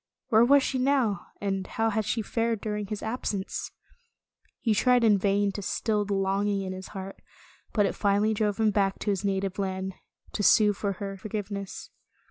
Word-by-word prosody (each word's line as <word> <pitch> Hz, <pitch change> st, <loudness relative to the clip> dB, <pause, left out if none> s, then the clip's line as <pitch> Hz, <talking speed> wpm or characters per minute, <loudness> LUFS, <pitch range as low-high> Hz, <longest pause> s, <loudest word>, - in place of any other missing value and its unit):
Where 225 Hz, -1 st, +6 dB
was 275 Hz, +3 st, +5 dB
she 260 Hz, -, -1 dB
now, 255 Hz, -6 st, +1 dB
and 195 Hz, -2 st, -2 dB
how 225 Hz, 0 st, 0 dB
had 215 Hz, 0 st, 0 dB
she 225 Hz, +2 st, -1 dB
fared 230 Hz, +1 st, -1 dB
during 210 Hz, -1 st, -3 dB
his 210 Hz, +1 st, -5 dB
absence? 220 Hz, -4 st, -3 dB, 0.9 s
He 225 Hz, -, +1 dB
tried 250 Hz, +3 st, +3 dB
in 210 Hz, -3 st, +5 dB
vain 200 Hz, +1 st, +2 dB
to 205 Hz, -, -5 dB
still 210 Hz, +1 st, 0 dB
the 200 Hz, 0 st, -1 dB
longing 195 Hz, +1 st, 0 dB
in 185 Hz, 0 st, -4 dB
his 185 Hz, 0 st, -8 dB
heart, 195 Hz, 0 st, -8 dB, 0.5 s
but 205 Hz, -2 st, +3 dB
it -, -, 0 dB
finally 205 Hz, +1 st, +2 dB
drove 210 Hz, -1 st, 0 dB
him 220 Hz, -1 st, +3 dB
back 195 Hz, -1 st, +1 dB
to 205 Hz, -, -1 dB
his 195 Hz, -1 st, -2 dB
native 195 Hz, -1 st, -1 dB
land, 190 Hz, -1 st, -2 dB, 0.4 s
to -, -, -3 dB
sue 210 Hz, +1 st, +5 dB
for 200 Hz, 0 st, -2 dB
her 195 Hz, 0 st, -6 dB
forgiveness. 200 Hz, -1 st, -5 dB
205 Hz, 185 wpm, -27 LUFS, 195-220 Hz, 0.9 s, Where